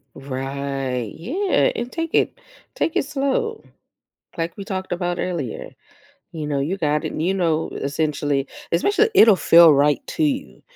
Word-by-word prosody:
Right. 135 -3 -4
Yeah, 380 - +1
and 245 - -4
take 330 -1 -4
it - - +1 0.4
take 330 - -1
it - - +1
slow, 300 - -2 0.7
like 165 0 -3
we 200 - -6
talked 190 -3 -5
about 175 0 -2
earlier, 165 -10 -4 0.6
you 155 -3 -5
know, 145 -2 -1
you 160 +8 -1
got 150 -4 0
it - - -3
and, 155 - -3
you 185 +4 +1
know, 165 -4 0
essentially 145 -1 -1 0.3
especially 410 - +2
it'll 215 - +7
feel 170 -2 +7
right 145 +1 +2
to 315 - 0
you, 275 -2 -3
170 Hz, 155 wpm, -21 LUFS, -, 0.7 s, it'll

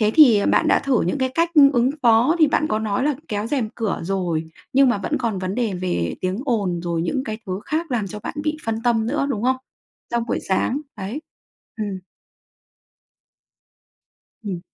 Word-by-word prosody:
Thế 215 -1 +3
thì, 260 -9 +8
à, 200 - 0
bạn - - +3
đã - - +5
thử 270 -4 +1
những 180 - -1
cái 260 0 +1
cách 335 +1 +2 0.2
ứng 245 +1 +3
phó 240 +7 +4
thì 315 - +6
bạn 310 +1 +1
có 215 - 0
nói 220 +4 -1
là 295 -1 +2
kéo 210 0 -2
rèm 245 -4 -1
cửa 225 -4 -2
rồi, 170 -3 -2 0.2
nhưng 275 0 +5
mà 225 -5 +1
vẫn 300 +10 -2
còn 230 -6 -1
vấn 185 +1 -3
đề 230 -6 -1
về 130 - -2
tiếng 185 +1 -1
ồn, 200 -10 0
rồi 170 -1 -1
những 265 +8 -1
cái 215 -1 -4
thứ 185 +2 -3
khác 315 0 -2
làm 220 -5 0
cho 210 +2 -7
bạn - - -6
bị 305 0 0
phân 225 0 -2
tâm 225 -2 +2
nữa, 280 +2 0
đúng 215 -3 -2
không? 260 +1 +2 0.5
Trong 235 -1 0
buổi - - -1
sáng, 245 +8 +1 0.2
đấy. 210 +9 -5 0.6
Ừm. 205 -3 -4 2.4
Ừm. 185 -4 -4
225 Hz, 200 wpm, -22 LUFS, 195-260 Hz, 2.4 s, thì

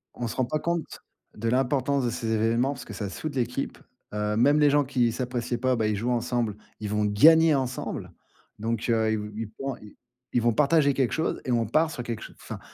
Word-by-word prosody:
On 120 - -3
se - - -5
rend 130 - +1
pas 155 +4 -2
compte, 170 -1 -3 0.3
de 115 +2 -2
l'importance 135 +2 +1
de 120 - +1
ces 115 -1 -3
événements 115 +5 +2
parce 125 -3 -9
que 105 - -9
ça 100 0 -4
soude 145 +6 -5
l'équipe, 125 +2 -2 0.4
heu, 105 0 -1
même 145 +5 +4
les 150 - +5
gens 145 +1 +4
qui 125 -3 +1
s'appréciaient 120 0 -2
pas, 130 +1 +1
bah, 110 -2 0
ils 105 - 0
jouent 120 +5 -1
ensemble, 120 -3 0 0.2
ils 105 - -4
vont 105 0 +1
gagner 160 +10 +6
ensemble, 130 -2 -3 0.5
donc 115 +1 -2
heu, 110 -1 +2
ils 110 - +1
v 105 0 -6
ils 110 -2 -4
font 135 -1 -3
i 105 -1 -15 0.4
ils 120 - +3
vont 120 +1 +3
partager 145 0 +3
quelque 130 -2 0
chose 160 - -1
et 130 - -1
on 115 -1 +2
part 155 +8 +2
sur 125 - -5
quelque 115 -2 -4
chose - - -10
enfin. - - -7
120 Hz, 230 wpm, -26 LUFS, 110-140 Hz, 0.5 s, gagner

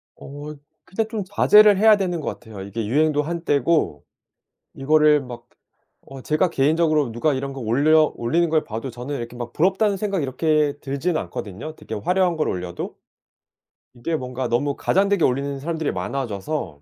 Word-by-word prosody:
어 145 +2 -9 0.3
근데 220 +4 -2
좀 220 -2 -4
자제를 210 +1 +6
해야 215 +2 +6
되는 180 -4 -2
것 155 - -6
같아요. 110 -4 -7
이게 100 +3 -4
유행도 150 +5 +2
한때고 155 - 0 0.7
이거를 150 +1 +4
막 120 -2 -10 0.6
어 135 -1 -10
제가 155 +7 +1
개인적으로 155 -3 +1
누가 140 +5 0
이런 135 +1 -4
거 135 - -8
올려 145 +7 +3
올리는 165 +9 +1
걸 155 -1 +1
봐도 115 +1 -5
저는 125 +5 -5
이렇게 120 +1 -7
막 120 -1 -6
'부럽다.'는 195 +4 +1
생각이 195 -4 -1
이렇게 150 +2 +1
들진 155 +4 -2
않거든요 115 +11 -6
되게 110 - -7
화려한 180 - +1
걸 155 - 0
올려도. 90 -1 -5 1.0
이게 160 +7 -3
뭔가 130 -2 -3
너무 140 +4 0
과장되게 195 -1 +2
올리는 140 +2 -1
사람들이 160 +1 -2
많아져서 110 - -4
145 Hz, 355 characters per minute, -22 LUFS, 125-165 Hz, 1.0 s, 자제를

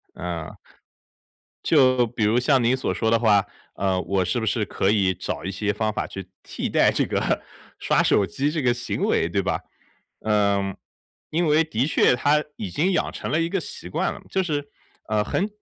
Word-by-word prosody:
嗯。 85 -3 -5 1.1
就 130 -5 +4
比 110 0 -3
如 115 +4 +3
像 130 0 +3
您 120 +2 +3
所 130 - -2
说 110 - 0
的 115 - +4
话， 105 -4 +3 0.3
呃， 95 -1 0
我 95 -1 0
是 95 +7 0
不 110 - -2
是 110 0 0
可 95 - 0
以 95 -3 +2
找 85 - -5
一 - - -2
些 105 +2 -1
方 110 +1 -1
法 - - -2
去 95 -2 -8 0.2
替 - - -4
代 - - +4
这 - - +1
个 - - 0 0.4
刷 - - +2
手 100 - +3
机 135 - -1
这 155 -1 -1
个 120 -1 +3
行 120 - -4
为， 80 - +1
对 100 +3 0
吧？ - - -1 0.6
嗯， 100 -2 +1 0.5
因 165 +2 0
为 155 +2 +4
的 135 -3 -1
确 125 - +4
它 150 +4 +2
已 100 - -4
经 165 - +1
养 175 - 0
成 - - -5
了 155 - +2
一 165 - +1
个 195 -2 -1
习 90 - -9
惯 - - -1
了， - - -11
就 190 -1 0
是， 145 -4 -3 0.4
呃， 105 -1 +2
很 190 - -1
110 Hz, 215 characters per minute, -24 LUFS, 100-145 Hz, 1.1 s, 就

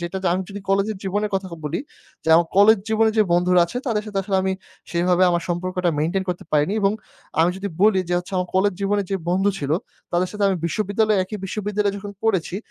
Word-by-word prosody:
যেটা 175 +2 -4 0.2
আমি 185 +1 0
যদি 200 0 -7
কলেজের 200 +2 +1
জীবনের 205 +2 -1
কথা 190 0 -4
খ - - -13
বলি 150 - -2 0.4
যে, - - -3
আমার 170 0 +3
কলেজ 210 +1 +7
জীবনে 220 0 +3
যে - - +7
বন্ধুরা 180 +1 +4
আছে, 245 - -7
তাদের 215 -4 0
সাথে 200 -2 -3
আসলে 195 0 0
আমি 190 0 0 0.4
সেইভাবে 180 +1 +2
আমার 170 -1 0
সম্পর্কটা 180 0 -1
মেইনটেইন 180 +5 0
করতে 180 - -3
পারিনি 150 +7 +2
এবং 195 +1 +3 0.5
আমি 170 - +4
যদি 200 +1 -4
বলি 210 -3 +5
যে, 175 - +1
হচ্ছে 180 +2 -9
আমার 180 -1 -1
কলেজ 200 +2 +3
জীবনে 200 +1 +1
যে 195 - +1
বন্ধু 195 +3 +2
ছিল, 140 0 -4 0.4
তাদের 180 +1 +1
সাথে 210 -1 -1
আমি 190 - +1
বিশ্ববিদ্যালয়ে, 210 +3 +1
একই 210 +2 -6
বিশ্ববিদ্যালয়ে 205 0 -1
যখন 200 0 -7
পড়েছি, 190 -5 0
195 Hz, 210 wpm, -22 LUFS, 180-205 Hz, 0.5 s, কলেজ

